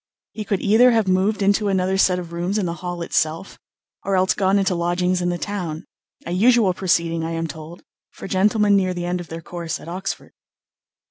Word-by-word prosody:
He 215 - -6
could 195 -1 -1
either 225 +5 +5
have 225 -4 +2
moved 195 +3 +1
into 205 +1 +2
another 190 -1 +1
set 190 -1 +3
of 170 -2 -7
rooms 175 +4 -2
in 205 - 0
the 170 - -2
Hall 175 -1 -4
itself, 160 +3 -2 0.4
or 195 - 0
else 185 0 +3
gone 195 0 +2
into 195 -1 +1
lodgings 180 +1 0
in 175 - 0
the 175 - -1
town 175 -6 -5 0.4
a 170 - -5
usual 215 +1 +4
proceeding, 170 -3 0
I 165 +1 -3
am 165 0 -2
told, 160 +2 -9 0.3
for - - -10
gentlemen 205 +2 +3
near 185 -2 +1
the 175 0 -4
end 175 0 -2
of 175 - -10
their 165 +1 -7
course 170 0 -5
at - - -13
Oxford. 185 +3 -5
185 Hz, 205 wpm, -21 LUFS, 170-200 Hz, 0.4 s, either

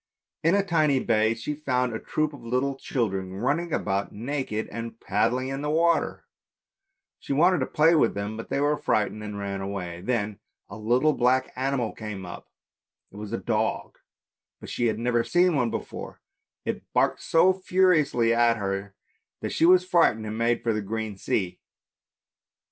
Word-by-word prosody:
In 165 +4 +4
a 200 -1 +2
tiny 155 -7 +2
bay 110 -2 +2
she 115 +6 -4
found 125 -5 -1
a 110 - -3
troop 155 -1 -1
of 135 -4 -11
little 125 +4 0
children 95 -8 -2
running 150 - -1
about 100 -7 -1
naked 120 -1 -3
and 115 0 -6
paddling 120 +6 0
in 135 +1 -4
the 150 - -2
water; 165 +2 +1 0.9
she - - -4
wanted 175 +5 +4
to 130 - -1
play 160 +2 +4
with 160 - +3
them, 100 +2 -3
but 115 - -8
they - - 0
were 145 +1 +2
frightened 110 -3 0
and 105 -1 -6
ran 100 -1 -4
away. 90 -3 -5
Then 110 -2 -2 0.3
a 100 - -9
little 120 +8 +2
black 130 +1 +1
animal 130 -3 -1
came 105 -4 -7
up, 85 - -9 0.6
it 100 - -13
was 105 -1 -7
a - - -1
dog, - - -2 0.6
but - - -9
she 120 - 0
had 110 - 0
never 120 0 +1
seen 175 +2 +3
one 125 -4 +1
before; - - -6 0.5
it - - -2
barked - - +2
so 175 +3 +4
furiously 180 -11 +2
at 115 0 +3
her 100 -1 -3 0.5
that - - -3
she 165 - +3
was 180 0 +6
frightened 165 -12 +3
and 105 0 -4
made 115 +1 +1
for 115 - +1
the 110 - -1
open 110 +1 -4
sea. 95 -1 -2
120 Hz, 175 wpm, -26 LUFS, 105-150 Hz, 0.9 s, was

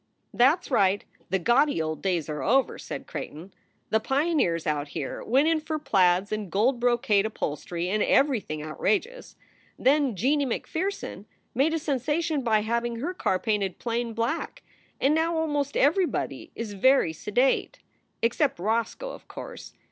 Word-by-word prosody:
"That 275 +9 +4
s - - -13
right, 200 -4 +2 0.2
the 190 - +2
gaudy 240 - +3
old 155 -1 -2
days 180 -5 0
are 150 -2 -4
over," 260 - +2
said - - -6
Creigh - - -5
ton. 170 +6 -12 0.4
"The 220 - +4
pioneers 270 - +1
out 150 -2 -1
here 145 -1 -5
went 270 +6 +3
in 325 -1 +3
for 310 0 -3
plaids 185 -8 +2
and 210 -4 -3
gold 235 +7 +2
brocade 235 -4 +2
upholstery 170 -2 -4
and 210 +3 0
everything 215 - +1
outrageous. 435 - -2 0.4
Then 275 -3 +2
Jeanie 275 +8 +1
MacPherson 370 - -3 0.3
made 290 +6 +2
a - - +1
sensation 300 +1 -1
by 220 -4 +2
having 235 +2 -1
her 295 +11 -3
car 190 - 0
painted 200 -2 -1
plain 235 0 -2
black, 250 - -3 0.4
and 275 +3 +3
now 325 +1 +1
almost 290 -3 -1
everybody 330 +6 +1
is 225 -3 -5
very 205 -4 +3
sedate 225 - 0 0.5
except 260 +5 +1
Roscoe, 230 - -1
of - - -12
course. - - -9
235 Hz, 155 wpm, -26 LUFS, 195-295 Hz, 0.5 s, That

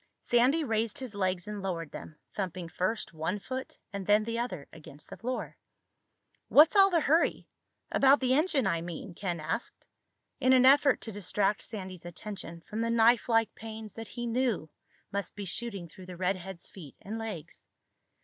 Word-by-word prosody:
Sandy 255 +7 +3
raised 225 -4 0
his 255 -5 -6
legs 185 -2 -1
and 210 -1 -5
lowered 170 -5 -3
them, 155 - -9 0.2
thumping 185 -3 -3
first 185 +6 -2
one 160 +5 -2
foot 260 +5 -6 0.2
and 200 -2 -5
then 210 +1 +5
the 230 +1 -2
other 180 - -4
against 155 -2 -13
the - - -7
floor. 250 +2 -4 0.9
"What's 310 +7 +7
all 390 -1 +8
the 340 -3 +3
hurry—about 285 -2 +2
the 255 -1 +2
engine, 300 -2 +3
I 170 -4 +1
mean?" 175 +2 -6
Ken 175 -2 -3
asked, 155 +9 -4 0.5
in 260 -1 +4
an 255 -1 +6
effort 280 0 +6
to 225 - -5
distract 205 +1 0
Sandy's 185 -5 -7
attention 175 -1 -6
from 210 +5 -6
the 230 - 0
knifelike 230 0 +4
pains 220 -2 -8
that 225 +1 -7
he 240 +2 -5
knew 230 - 0 0.4
must 200 0 -2
be 205 -1 -5
shooting 200 -2 -4
through 185 +3 -13
the 180 -1 -8
redhead's 185 -1 -2
feet 160 -8 -12
and 220 +3 -5
legs. 215 -9 -7
210 Hz, 170 wpm, -30 LUFS, 180-240 Hz, 0.9 s, all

